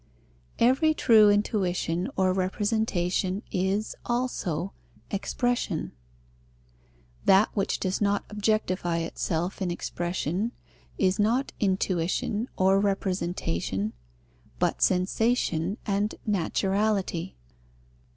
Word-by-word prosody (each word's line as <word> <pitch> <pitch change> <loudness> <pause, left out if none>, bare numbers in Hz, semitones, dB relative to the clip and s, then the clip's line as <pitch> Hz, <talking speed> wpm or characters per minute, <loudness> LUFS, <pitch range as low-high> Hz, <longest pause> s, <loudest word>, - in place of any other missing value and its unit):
Every 270 +6 +4
true 215 -6 +6
intuition 185 -4 0
or 185 -1 +2
representation 190 0 0
is, 195 +2 -1
also, 210 -8 -2 0.4
expression. 210 -3 -1 1.3
That 195 +3 +6
which 195 - 0
does 185 +2 -1
not 200 0 +1
objectify 200 -5 0
itself 165 +2 -2
in 185 - 0
expression 175 - -2 0.4
is 190 +1 +2
not 235 +6 +1
intuition 190 +3 0
or 190 +1 +4
representation, 175 - -1 0.6
but - - 0
sensation 185 -1 +1
and 205 +1 0
naturality. 195 -1 0
195 Hz, 85 wpm, -27 LUFS, 180-215 Hz, 1.3 s, true